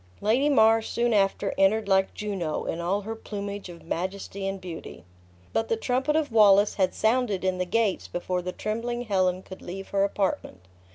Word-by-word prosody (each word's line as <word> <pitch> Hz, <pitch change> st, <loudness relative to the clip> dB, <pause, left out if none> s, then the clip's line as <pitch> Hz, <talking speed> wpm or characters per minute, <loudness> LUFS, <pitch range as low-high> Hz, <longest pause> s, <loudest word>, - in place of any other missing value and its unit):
Lady 245 Hz, +8 st, +2 dB
Mar 225 Hz, -4 st, +5 dB
soon 235 Hz, +1 st, 0 dB
after 195 Hz, -1 st, +1 dB
entered 205 Hz, +2 st, +3 dB
like 190 Hz, -1 st, +2 dB
Juno, 195 Hz, -7 st, -3 dB
in 165 Hz, -, -3 dB
all 190 Hz, +4 st, 0 dB
her 220 Hz, +2 st, -5 dB
plumage 200 Hz, -3 st, -6 dB
of 170 Hz, -1 st, -11 dB
majesty 195 Hz, +3 st, -4 dB
and 195 Hz, 0 st, -3 dB
beauty. 170 Hz, -, -8 dB, 0.5 s
But 225 Hz, -, 0 dB
the 225 Hz, -, +1 dB
trumpet 260 Hz, +6 st, 0 dB
of 315 Hz, -4 st, 0 dB
Wallace 205 Hz, -2 st, +6 dB
had 185 Hz, -2 st, 0 dB
sounded 220 Hz, -4 st, +1 dB
in 185 Hz, -1 st, 0 dB
the 180 Hz, -, 0 dB
gates 220 Hz, -1 st, 0 dB
before 180 Hz, +1 st, -2 dB
the 180 Hz, +1 st, -4 dB
trembling 235 Hz, +5 st, -3 dB
Helen 185 Hz, -4 st, +1 dB
could 190 Hz, -, -11 dB
leave 195 Hz, +2 st, -7 dB
her 195 Hz, 0 st, +2 dB
apartment. 195 Hz, -, -2 dB
200 Hz, 180 wpm, -26 LUFS, 185-225 Hz, 0.5 s, Wallace